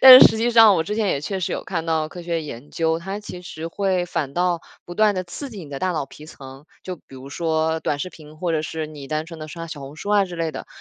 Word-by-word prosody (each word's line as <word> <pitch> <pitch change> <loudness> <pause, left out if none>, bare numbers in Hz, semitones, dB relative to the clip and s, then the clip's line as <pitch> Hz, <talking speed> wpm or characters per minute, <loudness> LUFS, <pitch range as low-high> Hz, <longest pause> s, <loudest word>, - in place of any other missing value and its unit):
但 260 -1 +13
是 - - +12
实 220 - -3
际 230 +2 +2
上 225 -3 +8
我 165 - +2
之 205 +6 -3
前 215 -2 +1
也 140 - +1
确 190 +6 -3
实 175 - -1
有 - - -3
看 160 - -2
到 160 -1 +1
科 175 +2 -9
学 170 -1 -1
研 145 -2 -8
究， 160 0 +1
它 195 +4 -5
其 180 -3 -8
实 165 -2 -6
会 185 0 0
反 140 -5 -2
倒 175 -1 +1 0.2
不 175 - -8
断 215 +1 +4
地 185 -1 -2
刺 265 +11 -7
激 215 - -8
你 145 - -12
的 140 - -4
大 185 - 0
脑 155 -5 -1
皮 150 - -13
层。 135 -2 -11 0.2
就 185 -1 -5
比 140 - -17
如 130 +1 -9
说 160 0 0
短 145 - -1
视 165 - -3
频， 155 -2 -14
或 170 +1 -1
者 155 -1 +1
是 160 0 -3
你 145 -3 -9
单 155 +1 -1
纯 165 -1 -9
地 155 - -6
刷 165 +2 -6
小 155 -3 -7
红 140 +2 -9
书 200 +6 -5
啊 205 -1 +5
之 180 -2 -7
类 165 -1 -1
的， - - -7
165 Hz, 315 characters per minute, -23 LUFS, 155-185 Hz, 0.2 s, 但